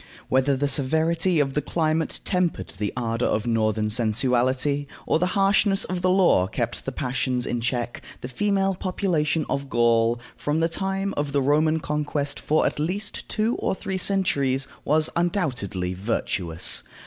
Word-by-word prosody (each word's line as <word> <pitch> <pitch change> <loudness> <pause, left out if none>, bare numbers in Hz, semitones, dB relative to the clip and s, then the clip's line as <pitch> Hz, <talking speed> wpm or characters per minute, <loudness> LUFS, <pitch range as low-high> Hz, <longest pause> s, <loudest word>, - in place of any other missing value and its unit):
Whether 130 +1 +2
the 145 +2 0
severity 160 +5 +1
of 135 -2 +1
the 150 - 0
climate 160 +1 -1
tempered 180 -3 0
the 105 +1 -3
ardor 115 -1 -1
of 105 - 0
northern 110 -2 0
sensuality, 125 +5 +1 0.2
or - - +2
the 180 - +1
harshness 195 0 +3
of 180 -1 -3
the 185 - +2
law 180 - +4
kept - - -3
the - - -2
passions 125 -1 -1
in 120 - -2
check, 120 0 -2 0.2
the - - -5
female 195 +7 0
population 175 -5 -1
of 140 0 -3
Gaul, 115 0 +2 0.2
from 150 +2 -1
the 165 +1 +2
time 195 +2 -1
of 145 -1 -2
the 140 - +2
Roman 155 +3 +2
conquest 145 -1 -2
for 155 +1 +1
at - - -1
least 195 +7 -2
two 220 +2 0
or - - -1
three 190 0 -4
centuries, 140 -9 +1 0.2
was 155 +1 +3
undoubtedly 125 - -1
virtuous. 90 -4 +1
145 Hz, 160 wpm, -24 LUFS, 120-175 Hz, 0.2 s, law